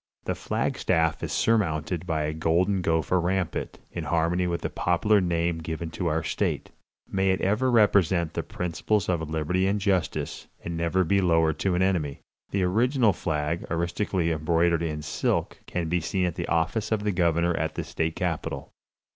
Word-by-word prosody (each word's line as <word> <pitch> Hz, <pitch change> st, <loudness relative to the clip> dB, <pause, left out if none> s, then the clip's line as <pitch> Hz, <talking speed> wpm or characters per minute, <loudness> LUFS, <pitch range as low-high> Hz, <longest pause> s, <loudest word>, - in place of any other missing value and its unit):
The -, -, -1 dB
flag -, -, -2 dB
staff 80 Hz, -1 st, +1 dB
is -, -, -3 dB
surmounted 90 Hz, -5 st, +1 dB
by 80 Hz, -3 st, 0 dB
a 75 Hz, +1 st, -2 dB
golden 85 Hz, +5 st, +1 dB
gopher 80 Hz, +1 st, +1 dB
rampant, 90 Hz, 0 st, -2 dB
in -, -, -5 dB
harmony 85 Hz, +2 st, +1 dB
with 85 Hz, -1 st, -2 dB
the -, -, -2 dB
popular 100 Hz, +4 st, +2 dB
name 85 Hz, -1 st, 0 dB
given 80 Hz, 0 st, -5 dB
to 90 Hz, +1 st, -2 dB
our 80 Hz, 0 st, 0 dB
state. -, -, -2 dB, 0.4 s
May 95 Hz, 0 st, +2 dB
it 95 Hz, -, +2 dB
ever 105 Hz, +7 st, +2 dB
represent 95 Hz, -7 st, +3 dB
the -, -, -1 dB
principles 90 Hz, +4 st, -1 dB
of 80 Hz, -4 st, -1 dB
liberty 80 Hz, +4 st, 0 dB
and 100 Hz, +1 st, +1 dB
justice, 95 Hz, -4 st, -1 dB, 0.2 s
and 85 Hz, -, -3 dB
never 85 Hz, +3 st, +1 dB
be 100 Hz, +3 st, +2 dB
lowered 80 Hz, -3 st, +2 dB
to 95 Hz, -2 st, +1 dB
an 90 Hz, -, +2 dB
enemy! 85 Hz, -7 st, 0 dB, 0.3 s
The 100 Hz, -1 st, 0 dB
original 115 Hz, +4 st, +3 dB
flag, 80 Hz, 0 st, -2 dB
artistically 85 Hz, +1 st, 0 dB
embroidered 85 Hz, +2 st, +2 dB
in 75 Hz, -2 st, -3 dB
silk, 75 Hz, -, -1 dB
can 85 Hz, -2 st, -2 dB
be 90 Hz, +1 st, 0 dB
seen 90 Hz, +3 st, 0 dB
at 90 Hz, -, -1 dB
the -, -, -4 dB
office 85 Hz, +7 st, 0 dB
of 110 Hz, -2 st, +1 dB
the 105 Hz, -, +1 dB
governor 85 Hz, -1 st, +2 dB
at -, -, -2 dB
the -, -, -2 dB
state 80 Hz, 0 st, -2 dB
capitol. 80 Hz, -5 st, -3 dB
85 Hz, 180 wpm, -26 LUFS, 80-95 Hz, 0.4 s, represent